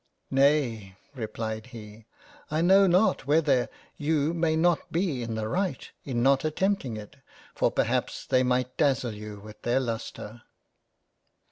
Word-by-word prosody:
" - - -46
Nay, 135 -8 +2 0.2
(replied 110 -2 -5
he) 110 -2 -12 0.4
I 155 +1 0
know 190 +3 +6
not 180 -6 +2
whether 145 -4 +3 0.3
you 150 +1 +1
may 165 -2 +1
not 170 +1 +1
be 165 -7 0
in 115 -1 -4
the 110 -1 -2
right 180 - -2 0.2
in 120 -4 -1
not 135 +1 +4
attempting 155 - -1
it, 105 -1 -10 0.4
for - - +2
perhaps - - -1
they 130 - +3
might 125 0 0
dazzle 130 -5 +1
you 105 0 -8
with 105 +1 -13
their 120 +2 +1
Lustre." 115 -2 -5
130 Hz, 145 wpm, -27 LUFS, 110-155 Hz, 0.4 s, know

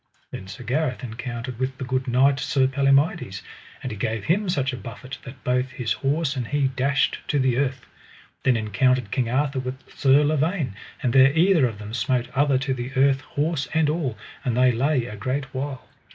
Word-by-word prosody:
Then 95 - -7
Sir 115 +5 -9
Gareth 130 +1 -1
encountered 120 +1 -5
with 130 0 -2
the 130 - -5
good 130 +1 -1
knight 135 +3 +3
Sir 135 -2 +2
Palomides, 135 - +1 0.4
and 130 - -3
he - - -4
gave 110 0 -2
him 195 - +1
such 140 -6 0
a - - -2
buffet 130 +3 -8
that 130 -1 -11
both 125 +1 +1
his 125 -3 -2
horse 145 +1 0
and 125 -3 -3
he 145 -1 +1
dashed 135 +1 +1
to 145 - +1
the 130 -3 +2
earth. 135 -2 -1 0.6
Then 125 -3 +3
encountered 110 +2 +1
King 125 -3 0
Arthur 135 +2 0
with 130 0 -4 0.2
Sir 140 +2 +5
Lavaine, 155 - 0 0.3
and 120 - +1
there 135 0 +7
either 170 -5 +5
of 110 -3 -6
them 105 +1 -8
smote 125 -1 0
other 140 -1 +3
to 135 +1 -1
the 125 0 -5
earth, 135 0 +3
horse 145 0 -2
and 155 -2 +3
all, 145 -9 -2 0.3
that 125 -4 0
they 125 0 +5
lay 130 +1 +1
a 110 - -7
great 130 +6 -2
while. 130 -1 -4
130 Hz, 195 wpm, -24 LUFS, 125-140 Hz, 0.6 s, there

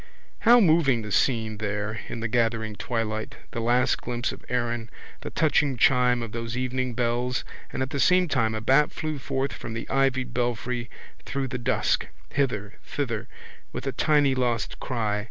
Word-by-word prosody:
How 240 +1 +7
moving 155 - +4
the 105 - -6
scene 110 -1 +1
there 105 0 -2
in 115 - -5
the 110 - 0
gathering 115 -2 0
twilight, 110 -1 -3 0.2
the - - -3
last 120 +2 +2
glimpse 120 +1 -2
of - - -10
Erin, 120 -2 -1 0.3
the - - -6
touching 145 -4 +2
chime 125 -1 +4
of 115 - -6
those 115 +1 -4
evening 130 -1 -1
bells 125 +1 0 0.3
and - - -1
at 130 - -5
the 140 - -2
same 180 +4 +4
time 115 -7 +1
a 110 - -3
bat 135 +6 +4
flew 155 -2 -3
forth 135 0 -2
from 115 - -6
the 115 - -5
ivied 130 -2 +1
belfry 120 0 -1 0.3
through 135 -1 -3
the 125 -1 -3
dusk, 120 - +1 0.2
hither, 110 -7 -1
thither, 120 -5 -3 0.4
with - - -5
a - - 0
tiny 145 -3 +3
lost 120 -3 -1
cry. 110 -5 -1
120 Hz, 170 wpm, -26 LUFS, 115-135 Hz, 0.4 s, How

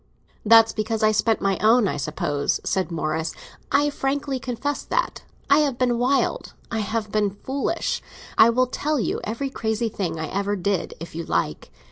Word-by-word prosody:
"That's 225 +1 +6
because 220 0 -2
I 215 - +5
spent 220 +1 +1
my 195 -2 +1
own, 220 0 +4
I - - -2
suppose," 145 -1 -1
said 185 -3 0
Morris. 160 -1 -2 0.4
"I 290 +1 +3
frankly 275 -1 -2
confess 265 +3 -3
that. - - -1 0.3
I 280 +2 +5
have 285 -5 +1
been 245 -2 +1
wild. 275 - 0 0.2
I 225 - -1
have 215 0 -2
been 210 -1 +2
foolish. 275 +5 -1 0.3
I 225 - +7
will 255 +2 +3
tell 295 +3 -1
you - - -1
every 265 +5 -3
crazy 225 -1 -1
thing 170 -6 -3
I 160 - -2
ever 200 +1 -1
did, 195 0 -1
if 165 0 -8
you 165 +1 -4
like. - - -2
225 Hz, 175 wpm, -23 LUFS, 200-265 Hz, 0.4 s, I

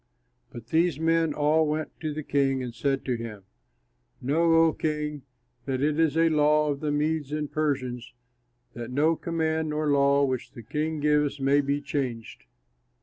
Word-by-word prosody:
Then 120 - -9
these 165 -2 +2
men 165 0 +2
all 155 +1 +2
went 155 +1 -2
to 155 -1 -3
the 155 +1 -5
king 135 -2 +1
and 120 -2 -6
said 135 +3 -1
to 130 - 0
him, 110 -4 -8 0.8
"Know, 165 +5 +2
O 160 - +2
king, 150 -2 -3 0.4
that 135 -2 -2
it 150 +1 +1
is 160 -1 +2
a 165 0 +4
law 150 0 +3
of 140 - -4
the 150 0 -2
Medes 150 -1 -1
and 150 -1 -3
Persians, 130 -5 -2 0.6
that 120 0 -7
no 150 +6 +2
command 160 -1 -1
nor 150 0 0
law 140 0 +4
which 130 -2 -3
the 115 - -10
king 155 +6 -3
gives 150 -1 +1
may 140 +1 +3
be 140 +1 -1
changed." 130 -6 -4
150 Hz, 170 wpm, -26 LUFS, 135-155 Hz, 0.8 s, a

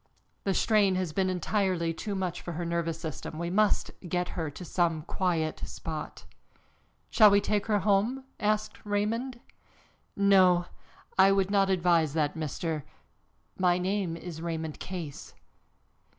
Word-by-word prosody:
The 195 -2 +1
strain 205 -4 +3
has 185 -4 -2
been 190 +1 +1
entirely 185 -2 0
too 200 +5 -4
much 185 -2 -3
for 175 - -6
her 170 +2 -3
nervous 170 -1 -2
system. 155 -1 -6
We 170 +1 -3
must 210 +2 +2 0.2
get 180 +1 -1
her 160 -3 -3
to 175 +5 -9
some 165 -3 0
quiet 165 -2 -1
spot." 155 -2 -6 0.9
"Shall 215 -2 +8
we 200 0 +5
take 205 0 -1
her 210 -2 +3
home?" 210 +7 +1 0.2
asked 215 0 -1
Raymond. 225 +5 -1 0.8
"No, 185 -3 +5 0.5
I 195 +1 +7
would 195 0 +2
not 195 -1 +3
advise 170 -5 +2
that, 150 -2 +1
Mr. 160 0 -3 0.4
" - - -39
"My 180 -1 +3
name 185 -2 -1
is 165 -2 -8
Raymond 160 -2 -4
Case." 170 -6 -7
180 Hz, 145 wpm, -29 LUFS, 165-200 Hz, 0.9 s, Shall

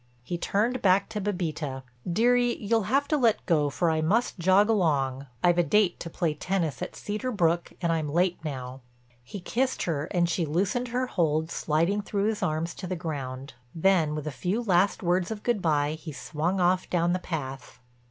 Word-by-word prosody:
He 175 - -4
turned 220 +8 0
back 190 0 +3
to 215 -1 -4
Bébita. 160 -9 -3 0.3
"Dearie, 245 +5 +3
you'll 225 0 0
have 280 +3 +2
to 305 - +3
let 235 -5 +2
go 150 -5 +2
for 165 +4 +1
I 160 0 0
must 205 +6 +1
jog 190 +4 +4
along. 140 -10 +1 0.2
I've 175 0 +4
a - - +5
date 205 0 +2
to 170 - -6
play 165 -2 -1
tennis 165 -4 -2
at - - -5
Cedar 215 +5 -3
Brook 170 -5 +1
and 170 - +2
I'm 160 -2 -1
late 175 +2 +1
now." 130 -3 -6 0.4
He 195 - -8
kissed 255 +8 -1
her 150 -4 -1
and 175 +1 +1
she 175 +1 0
loosened 195 +11 0
her 250 +2 -1
hold 160 -7 0
sliding 170 +7 +1
through 200 0 -1
his 220 0 -3
arms 165 -1 -1
to 185 - -6
the 185 - -2
ground. 140 -5 -5 0.2
Then 165 -3 +3
with 150 -1 -4
a 155 - -3
few 190 - -2
last 190 -2 +2
words 175 0 +1
of 220 -2 -5
good 235 -5 +1
by 150 -3 +2
he 155 +1 -7
swung 160 +6 -2
off 180 +1 +2
down 175 0 +1
the 185 - 0
path. 135 -7 -6
175 Hz, 195 wpm, -27 LUFS, 155-205 Hz, 0.4 s, a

